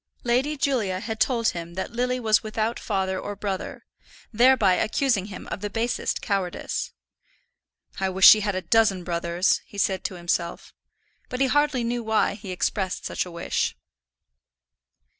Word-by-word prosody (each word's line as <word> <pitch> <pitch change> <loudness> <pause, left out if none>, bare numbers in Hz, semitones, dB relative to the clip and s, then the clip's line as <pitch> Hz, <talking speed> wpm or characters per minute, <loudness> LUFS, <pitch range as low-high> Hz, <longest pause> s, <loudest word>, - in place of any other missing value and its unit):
Lady 260 +5 +1
Julia 225 -10 0
had 220 +2 -5
told 235 -3 +2
him 170 0 -6
that 190 - -4
Lily 250 +2 -1
was 220 -3 +3
without 220 +1 -2
father 190 -2 -1
or 205 - -5
brother, 195 -2 -5 0.5
thereby 235 -4 +5
accusing 220 0 +1
him 195 -3 -9
of - - -4
the 205 - -3
basest 230 +3 -2
cowardice. 195 -4 -2 1.1
"I 190 0 0
wish 190 +1 +6
she 215 - +10
had 205 -2 -1
a 185 - -3
dozen 215 -5 +3
brothers," 170 +1 0
he 205 - -12
said 190 -1 0
to 185 - -3
himself. 175 0 -3 0.6
But 250 - -4
he 270 - +4
hardly 290 -2 +2
knew 240 +1 -1
why 220 -2 +1
he 200 -1 -10
expressed 185 +1 -2
such - - -2
a - - -9
wish. 170 0 -2
205 Hz, 160 wpm, -25 LUFS, 185-235 Hz, 1.1 s, she